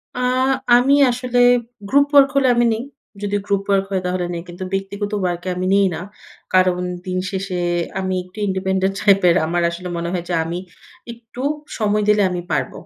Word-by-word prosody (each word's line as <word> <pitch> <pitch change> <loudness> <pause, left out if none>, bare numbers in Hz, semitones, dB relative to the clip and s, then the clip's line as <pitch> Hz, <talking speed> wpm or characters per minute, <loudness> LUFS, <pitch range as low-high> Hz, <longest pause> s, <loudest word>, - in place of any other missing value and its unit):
আ 250 - -3 0.6
আমি 265 +3 +4 0.2
আসলে 250 0 -3 0.5
group 285 +3 +4
work 280 -1 +7
হলে 275 -1 +3
আমি 240 0 +3
নেই। 225 - -3 0.4
যদি 205 0 -2
গ্রুপ 200 -1 0
ওয়ার্ক 195 -1 +2
হয়, 190 -1 0
তাহলে 180 0 -1
নেই 170 - -4
কিন্তু 175 +1 -8
ব্যক্তিগত 200 +2 -3
ওয়ার্ক 175 -2 -1
এ - - 0
আমি 180 +1 -2
নিই 200 -1 +4
না। - - -6 0.5
কারণ 185 -1 +3 0.3
দিন 185 0 -3
শেষে 190 -1 -4 0.4
আমি 185 0 -2
একটু 185 +3 -20
ইন্ডিপেন্ডেন্ট 190 0 0
টাইপের। 195 -4 +4
আমার 175 +2 -1
আসলে 175 +1 -7
মনে 170 0 -3
হয়, 175 -2 -2
যে - - -1
আমি 170 +2 -4 0.5
একটু 235 +1 -11 0.4
সময় 210 -1 +1
দিলে 210 0 +4
আমি 180 -1 -3
পারব। - - 0
195 Hz, 180 wpm, -20 LUFS, 180-210 Hz, 0.6 s, ওয়ার্ক